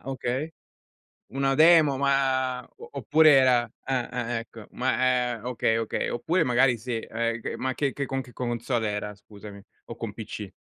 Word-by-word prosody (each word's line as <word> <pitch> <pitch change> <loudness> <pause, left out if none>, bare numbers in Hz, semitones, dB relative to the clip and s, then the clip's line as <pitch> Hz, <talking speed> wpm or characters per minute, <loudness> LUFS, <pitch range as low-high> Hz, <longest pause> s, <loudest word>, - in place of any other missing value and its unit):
okay. 135 +4 -3 0.8
Una 135 0 0
demo, 155 -3 +6
ma 130 -2 +1
o 465 +2 -12
oppure 155 - +4
era 130 -3 +5 0.2
ah, 130 -2 -1
ah, 120 -1 -3
ecco. 115 -2 -9
Ma, 125 -1 +1
è - - -10
okay, 115 -2 0
okay. 115 -1 -2
Oppure 165 +8 0
magari 125 -1 +3
sì, 115 0 -4
eh, 115 +1 -3 0.2
ma 130 0 -2
che 140 -1 -1
che 140 - -4
con 135 +1 -3
che 125 -1 -14
console 120 -2 -2
era 105 0 -4
scusami? 100 0 -12 0.3
O 115 - -8
con 115 -3 -6
PC? 105 -3 -7
125 Hz, 165 wpm, -26 LUFS, 115-135 Hz, 0.8 s, demo